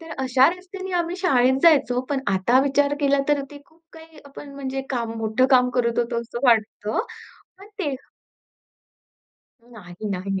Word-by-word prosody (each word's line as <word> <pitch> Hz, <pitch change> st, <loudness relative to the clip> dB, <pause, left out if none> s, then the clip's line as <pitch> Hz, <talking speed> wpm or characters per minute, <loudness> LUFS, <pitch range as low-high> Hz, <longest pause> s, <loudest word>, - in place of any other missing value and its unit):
तर 325 Hz, 0 st, -12 dB
अशा 260 Hz, +1 st, +4 dB
रस्त्याने 380 Hz, 0 st, -9 dB
आम्ही 345 Hz, +1 st, -2 dB
शाळेत 265 Hz, -8 st, +2 dB
जायचो. 275 Hz, -7 st, +4 dB
पण 275 Hz, -2 st, 0 dB
आता 235 Hz, +8 st, +3 dB
विचार 285 Hz, +1 st, +1 dB
केला 280 Hz, -1 st, +2 dB
तर 290 Hz, -1 st, +2 dB
ते 285 Hz, -1 st, -11 dB
खूप 320 Hz, +1 st, -28 dB
काही 320 Hz, -1 st, -15 dB
आपण 280 Hz, 0 st, -12 dB
म्हणजे 270 Hz, -1 st, -4 dB
काम, 235 Hz, -3 st, -2 dB
मोठं 225 Hz, +4 st, +1 dB
काम 250 Hz, -1 st, +4 dB
करत 235 Hz, -1 st, 0 dB
होतो 235 Hz, 0 st, -1 dB
असं 235 Hz, 0 st, -7 dB
वाटत 220 Hz, -2 st, +1 dB, 0.7 s
पण 395 Hz, +1 st, -14 dB
ते 295 Hz, -8 st, -2 dB, 1.7 s
नाही 215 Hz, -4 st, -10 dB
नाही. 195 Hz, +1 st, -3 dB
265 Hz, 155 wpm, -22 LUFS, 235-295 Hz, 1.7 s, अशा